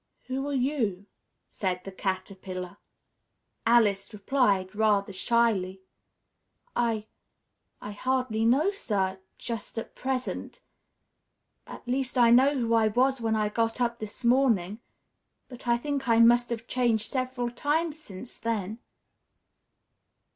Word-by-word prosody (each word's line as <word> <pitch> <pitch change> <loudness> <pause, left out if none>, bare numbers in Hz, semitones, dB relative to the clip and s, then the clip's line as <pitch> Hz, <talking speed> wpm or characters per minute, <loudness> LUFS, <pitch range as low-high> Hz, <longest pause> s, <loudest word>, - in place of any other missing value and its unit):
"Who 265 +2 -3
are - - -2
you?" 245 -8 -1 0.4
said 185 -2 -3
the 195 - -7
Caterpillar. 185 -1 -5 0.9
Alice 225 -4 +3
replied, 205 -3 +1
rather 205 -2 +2
shyly, 195 -3 +1 0.9
"I 230 -3 0 0.8
I 205 - -5
hardly 250 0 -1
know, 275 - +3
sir, 195 - -2 0.2
just 230 -2 -6
at 225 - -5
present 260 -1 -4 1.1
at - - -11
least 260 +1 -1
I 235 -1 +6
know 270 +4 +5
who 230 -2 0
I 225 -1 +4
was 255 +4 +2
when 225 -1 +1
I 215 -1 +1
got 225 +2 -1
up 235 -1 0
this 215 +3 -6
morning, 230 -6 +2 0.7
but 250 -1 -11
I 235 0 +4
think 280 0 -3
I 230 - +5
must 240 +1 +5
have 230 -1 -4
changed 235 -4 0
several 255 -2 -2
times 305 +5 -1
since 235 -5 -11
then." 220 -1 -3
230 Hz, 125 wpm, -27 LUFS, 205-255 Hz, 1.1 s, I